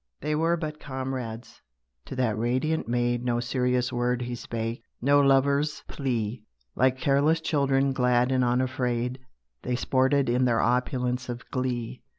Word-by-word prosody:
They 150 +2 -2
were 165 +3 +2
but 155 -2 -5
comrades. 130 -5 -5 0.4
To - - -7
that 125 -5 +1
radiant 130 +8 0
maid 120 0 0
No 120 -1 0
serious 125 +1 0
word 120 0 0
he 120 0 -4
spake; 115 -1 -4 0.2
no 140 +3 +4
lovers' 140 +2 +2
plea. 120 -5 -2 0.3
Like 130 +1 +3
careless 140 +4 +2
children, 140 -3 +1
glad 125 -1 +2
and 130 -1 +2
unafraid, 125 0 0 0.4
They 125 - -2
sported 130 +2 +2
in 125 +2 +2
their 115 -2 +2
opulence 125 0 0
of 120 0 -6
glee. 125 -2 -3
125 Hz, 145 wpm, -27 LUFS, 120-135 Hz, 0.4 s, no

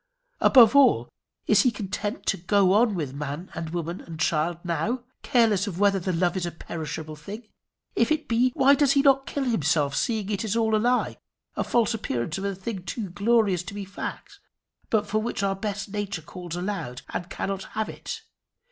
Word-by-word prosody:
Above 245 -1 +7
all, 280 -2 +5 0.4
is - - +5
he 255 - +4
content 205 - -4
to - - +2
go 190 +1 +3
on 215 0 +4
with 150 -7 -3
man 145 +5 -5
and 165 0 -5
woman 170 +1 -4
and 165 -2 -9
child 160 +1 +1
now, 185 +9 -1 0.2
careless 220 -5 +3
of 180 -4 -4
whether 200 -1 +4
the 185 +1 -2
love 175 +2 +1
is 185 - -2
a - - -4
perishable 160 -1 -6
thing? 205 +9 -9 0.5
If - - +2
it 310 -1 0
be, 240 +2 +3
why 275 +1 +6
does 285 -1 +4
he 275 - +3
not 270 -1 +4
kill 285 - -2
himself, 150 - +1
seeing 215 -4 -1
it 200 0 -1
is 220 -1 -1
all 220 -1 +2
a 215 - +2
lie 245 +2 +1 0.4
a - - 0
false 235 -1 +2
appearance 165 - -2
of 195 - -4
a 200 -1 -1
thing 195 +1 -5
too 195 +1 -5
glorious 205 -2 +2
to 190 +3 -8
be 205 -1 -5
fact, 195 +1 -7 0.5
but 215 -2 +2
for 215 +1 0
which 220 -3 -3
our 195 0 +1
best 200 0 -4
nature 200 -5 -3
calls 175 0 -7
aloud 175 -9 -4
and 175 0 -4
cannot 195 0 -3
have 220 0 0
it? - - -7
200 Hz, 200 wpm, -26 LUFS, 175-225 Hz, 0.5 s, Above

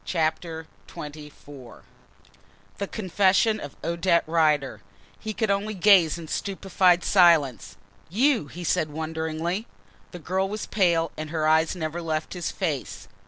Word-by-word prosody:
CHAPTER 160 -1 -2 0.2
XXIV 145 -2 -11 1.0
THE 200 - -2
CONFESSION 200 +2 +2
OF 145 -6 -8
ODETTE 170 0 +1
RIDER 150 -8 +1 0.4
He 220 - -5
could 215 -1 -1
only 205 +2 -1
gaze 180 -4 +5
in 165 -2 -9
stupified 185 -1 +1
silence. 165 - +3 0.3
"You!" 235 - +2
he 175 +5 -9
said 155 -1 0
wonderingly. 160 +5 -3 0.4
The 180 - -9
girl 185 +4 -2
was 210 +1 -4
pale 170 -5 +1
and 155 0 -5
her 155 -1 -1
eyes 160 +2 +3
never 165 0 -4
left 160 -1 -3
his 175 -2 -3
face. - - -4
170 Hz, 130 wpm, -25 LUFS, 155-190 Hz, 1.0 s, gaze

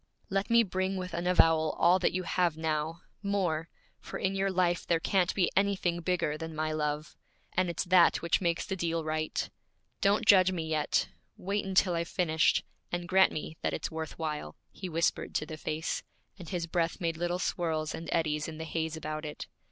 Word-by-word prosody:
'Let 195 +2 0
me 235 0 +6
bring 190 -1 -1
with 185 -1 -5
an 170 +1 -2
avowal 165 -3 +4
all 175 +2 +5
that 180 - +2
you 185 +1 -2
have 175 -1 +1
now, 160 +1 -2 0.2
more! 180 -6 -1 0.3
for - - -7
in 190 0 0
your 195 0 +1
life 180 -2 +1
there 170 -1 +3
can't 185 +2 +2
be 180 -3 +2
anything 190 -3 +1
bigger 165 -4 0
than 160 -1 -6
my 155 0 -1
love. 150 0 -2 0.4
And 185 -1 +1
it's 170 - -1
that 180 -1 +5
which 170 +2 +1
makes 170 -2 0
the 190 - -3
deal 165 -2 -1
right. 155 0 -2 0.5
Don't 200 +1 +3
judge 185 -2 +7
me 165 -3 -3
yet! 155 -2 +1 0.3
Wait 200 +2 -2
until 185 -1 +3
I've 170 0 -1
finished, 160 -3 +2 0.3
and 175 0 -2
grant 190 +1 +5
me 155 +1 -5
that - - 0
it's - - -4
worth 160 -1 -5
while.' 155 -2 -4 0.2
He 185 - -6
whispered 165 0 0
to - - 0
the 155 - -7
face, 155 +1 -3 0.3
and 175 -5 -10
his 175 -3 -2
breath 170 +1 -1
made 165 -3 -1
little 175 +2 -1
swirls 160 -4 -1
and 165 - -6
eddies 150 -3 0
in 160 -1 -7
the 160 - -5
haze 160 0 -2
about 155 0 -4
it. 150 -1 -6
170 Hz, 200 wpm, -30 LUFS, 160-185 Hz, 0.5 s, judge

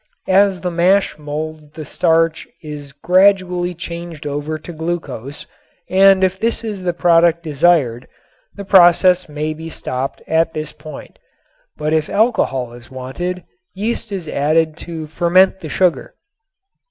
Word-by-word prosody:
As 195 -1 +3
the 180 - -2
mash 180 0 +2
molds 150 +1 -6
the 155 - -8
starch 165 0 +1 0.2
is 145 -2 -8
gradually 180 +2 +2
changed 170 -2 -8
over 145 +2 -3
to 165 +3 -10
glucose 155 -5 -5 0.5
and 190 0 +5
if 190 0 +1
this 230 +1 -1
is 210 -4 -5
the 180 -1 0
product 170 -1 +3
desired 145 -6 +1 0.5
the 200 - -8
process 180 -1 +5
may 150 +1 -3
be 160 +1 -8
stopped 130 -3 -5
at 165 +1 +1
this 155 -1 -4
point. 155 -1 -11 0.6
But 155 +1 -1
if 155 -1 0
alcohol 135 - 0
is 120 0 -14
wanted 170 +8 -5 0.3
yeast 215 +2 -3
is 185 -5 -5
added 155 +2 +1
to 165 -2 -7
ferment 175 +5 +3
the 160 - -8
sugar. 185 - 0
165 Hz, 140 wpm, -18 LUFS, 150-185 Hz, 0.6 s, and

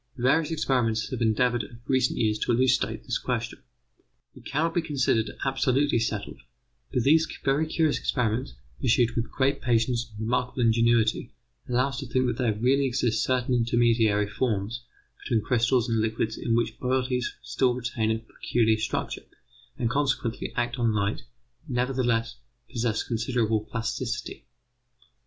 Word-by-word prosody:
Various 135 +6 +2
experimenters 120 -8 0
have 125 -2 -4
endeavoured 120 +2 +2
of 115 - -11
recent 130 -2 +1
years 110 -1 +1
to - - 0
elucidate 125 +2 +1
this - - -2
question. - - -3 0.7
It - - -13
cannot 160 +4 0
be 175 - +1
considered 130 -8 +1 0.2
absolutely 135 0 +2
settled, 110 - -3 0.5
but 125 - +1
these 160 +4 +4 0.2
very 140 +3 +2
curious 160 -1 +1
experiments, 115 - -1 0.3
pursued 120 0 +3
with 115 0 -1
great 140 +1 0
patience 120 0 +1
and 105 - -8
remarkable 125 +2 -1
ingenuity, 115 -1 +2 0.3
allow 125 +2 +2
us 130 -3 -5
to 135 - -6
think 130 +2 +1
that 120 -2 -1
there 115 -4 +1
really 135 +5 +2
exist 120 -3 0
certain 130 -1 0
intermediary 115 -3 +2
forms 110 0 -2 0.4
between 115 -5 0
crystals 125 0 +2
and 115 -2 +1
liquids 110 0 -1
in 115 - -1
which 115 -1 -1
bodies 125 -1 -1
still 125 -2 +1
retain 120 -3 -2
a 110 - +1
peculiar 110 0 0
structure, 110 - -3 0.5
and 115 -1 0
consequently 135 -4 -1
act 120 +1 -1
on 115 -2 +2
light, 100 0 -1 0.5
but 130 - -4
nevertheless 125 -2 0 0.3
possess 115 -3 -1
considerable 115 -2 0
plasticity. 115 +2 -4
120 Hz, 145 wpm, -26 LUFS, 115-130 Hz, 0.7 s, these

